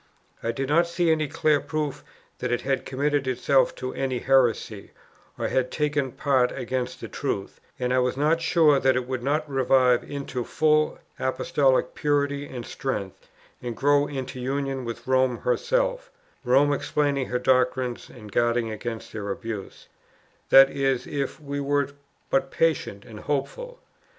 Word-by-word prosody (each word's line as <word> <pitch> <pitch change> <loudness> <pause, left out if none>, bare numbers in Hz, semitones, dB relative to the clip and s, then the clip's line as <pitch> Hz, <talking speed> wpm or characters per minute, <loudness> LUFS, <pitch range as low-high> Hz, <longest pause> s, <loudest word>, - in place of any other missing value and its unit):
I 115 - -1
did 135 +3 -3
not 165 +4 +3
see 170 -1 +1
any 155 -1 +1
clear 150 0 +2
proof 150 -2 -3 0.4
that 125 - -2
it 120 - 0
had 135 -1 -1
committed 140 +1 0
itself 130 +2 +2
to 130 0 -5
any 130 -2 -2
heresy, 120 -5 +1 0.4
or - - -1
had 125 -1 +1
taken 145 -3 -1
part 130 -4 +2
against 125 +1 -3
the - - -5
truth; 100 0 -4 0.2
and 125 0 -1
I 130 - +3
was 125 0 0
not 155 +3 +2
sure 155 -5 +4
that 130 -1 +3
it 125 -1 -1
would 130 -1 -3
not 150 +4 0
revive 130 -2 +3
into 140 -3 -4
full 155 +3 +2 0.2
Apostolic 130 +1 +1
purity 145 -1 0
and 120 -3 -7
strength, 105 -9 -5 0.3
and 120 -3 -5
grow 145 +1 +3
into 130 -2 -5
union 135 0 -2
with 115 0 -6
Rome 130 -1 +2
herself - - 0 0.3
(Rome 135 +3 +4
explaining 140 -1 0
her 125 - -1
doctrines 125 -1 +1
and 105 -4 -12
guarding 120 +1 +1
against 110 +1 -6
their 105 -2 -5
abuse), 105 0 -6 0.6
that 135 0 +8
is, 135 -2 0
if 140 -1 -3
we 140 -1 -5
were 140 0 +1 0.4
but 135 - +2
patient 150 -11 0
and 110 -2 -10
hopeful. - - -3
135 Hz, 155 wpm, -25 LUFS, 125-145 Hz, 0.6 s, that